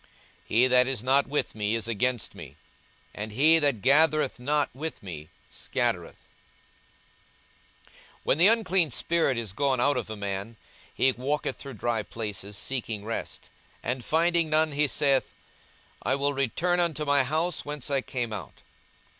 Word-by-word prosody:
42:011:023 - - 0
He 125 +2 +6
that 125 0 +4
is 130 -4 -1
not 135 +2 +3
with 145 +2 -1
me 105 0 -1
is 115 0 -3
against 120 +1 -1
me: - - -11 0.6
and 105 +1 -6
he 155 +8 +5
that 140 -9 0
gathereth 150 0 +3
not 145 +3 0
with 155 +1 -6
me 80 -5 -8 0.2
scattereth. - - -2
42:011:024 - - -28 2.0
When - - +2
the 175 - +8
unclean 190 -7 +3
spirit 160 -1 0
is 110 -5 -4
gone 135 +2 +1
out 140 +2 +2
of 120 - -4
a 110 - -5
man, 100 +2 -5 0.4
he 130 - +3
walketh 135 +4 -2
through 135 -3 -9
dry 115 +1 -1
places, 105 -2 -6
seeking 110 -3 -3
rest; 115 - -5 0.3
and 125 +1 -2
finding 165 +2 +2
none, 155 0 +2
he 145 +1 +2
saith, 135 -1 +1 0.7
I 135 - +1
will 140 +1 0
return 140 - 0
unto 160 -3 0
my 145 -1 +4
house 160 +5 -1
whence 145 -2 -4
I 135 -1 +2
came 120 -4 -4
out. 105 - -8
135 Hz, 160 wpm, -27 LUFS, 115-150 Hz, 2.0 s, the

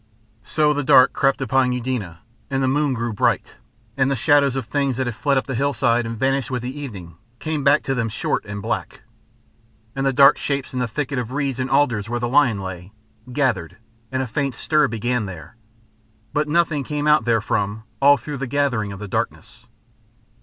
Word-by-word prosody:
So 150 +7 +1
the 145 0 -2
dark 130 -1 +6
crept 135 0 +1
upon 130 -1 +2
Eudena, 115 -10 -4 0.3
and 135 -1 0
the - - +2
moon 145 0 +1
grew 115 -1 -3
bright, 100 - 0 0.4
and 135 -1 +2
the 140 - +1
shadows 140 +1 +3
of 135 -3 -3
things 140 0 -1
that 130 - 0
had 120 -2 -3
fled 140 +2 +1
up 130 - 0
the 135 - -4
hillside 120 -3 +1
and 115 0 -5
vanished 135 +2 0
with 125 -2 -3
the 130 +2 -5
evening 100 - -8 0.2
came 155 +1 -3
back 140 +2 +4
to 135 - -1
them 115 -3 -1
short 110 - -2
and 100 -1 -6
black. - - -4 0.9
And 135 - -2
the 135 - +2
dark 135 +1 +6
shapes 140 -2 -3
in 130 - -2
the 125 - 0
thicket 135 +3 -3
of 120 -1 -5
reeds 140 -3 -2
and 130 0 -2
alders 120 -7 +1
where 120 0 -1
the 120 - -1
lion 125 -5 +3
lay, 95 0 -7 0.4
gathered, 105 - -1 0.3
and 130 0 -1
a - - -3
faint 135 +1 -2
stir 150 +3 +2
began 115 -1 -2
there. 90 +2 -10 0.8
But 150 +1 0
nothing 155 -2 +1
came 150 +1 -3
out 150 -4 +4
therefrom 110 -2 0 0.2
all 145 +1 +7
through 145 0 -6
the 135 0 -4
gathering 125 -6 0
of 100 - -7
the 105 - -6
darkness. - - -4
130 Hz, 200 wpm, -21 LUFS, 115-140 Hz, 0.9 s, all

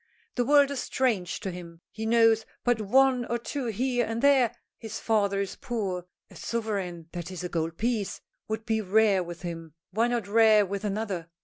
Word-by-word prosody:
The 245 - +1
world 285 0 +5
is 280 - -3
strange 220 -9 -1
to 195 -4 -3
him. 170 -2 -10
He 220 0 -4
knows 225 -1 +4 0.2
but 245 -2 +2
one 255 +4 +4
or 235 - -1
two 260 +3 -4
here 245 +3 0
and 225 0 -3
there. 270 -5 +5 0.3
His 220 -1 -6
father 200 -3 +1
is 200 -1 -3
poor. 190 -7 -3 0.2
A - - -14
sovereign 195 -8 -3
that 175 -1 -6
is, 180 -2 -6
a 180 - -3
gold 165 -1 -2
piece 225 -3 -1 0.3
would 220 0 -4
be 220 -2 0
rare 205 -1 +3
with 175 +1 -9
him, 165 -3 -6 0.2
why 225 +5 +2
not 240 -4 -1
rare 215 -1 +5
with 200 +2 -4
another? 200 -5 -3
215 Hz, 190 wpm, -27 LUFS, 185-235 Hz, 0.3 s, world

